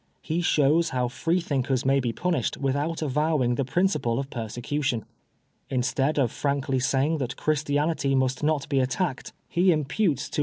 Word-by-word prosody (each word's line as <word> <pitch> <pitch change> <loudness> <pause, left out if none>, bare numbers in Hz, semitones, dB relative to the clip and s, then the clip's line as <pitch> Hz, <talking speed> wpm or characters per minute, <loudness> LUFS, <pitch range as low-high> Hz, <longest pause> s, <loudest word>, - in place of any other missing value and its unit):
He 165 +2 -1
shows 160 0 +3
how 125 -1 -1
Free 165 +9 0
thinkers 135 -5 -1
may 135 +1 +4
be 120 -3 -1
punished 170 -3 -1
without 145 +4 -1
avowing 150 -3 +1
the 135 - 0
principle 145 -5 0
of 135 0 -4
persecution. 120 +2 -2 0.6
Instead 135 +3 0
of 130 -5 +2
frankly 140 -2 -1
saying 140 +5 +1
that 130 -1 -3
Christianity 145 -1 0
must 130 -1 +1
not 150 -1 0
be 140 - +1
attacked, 130 +3 -1 0.2
he 180 +1 +3
imputes 155 - 0
to - - -29
PREFACE. - - -2
140 Hz, 160 wpm, -26 LUFS, 130-155 Hz, 0.6 s, may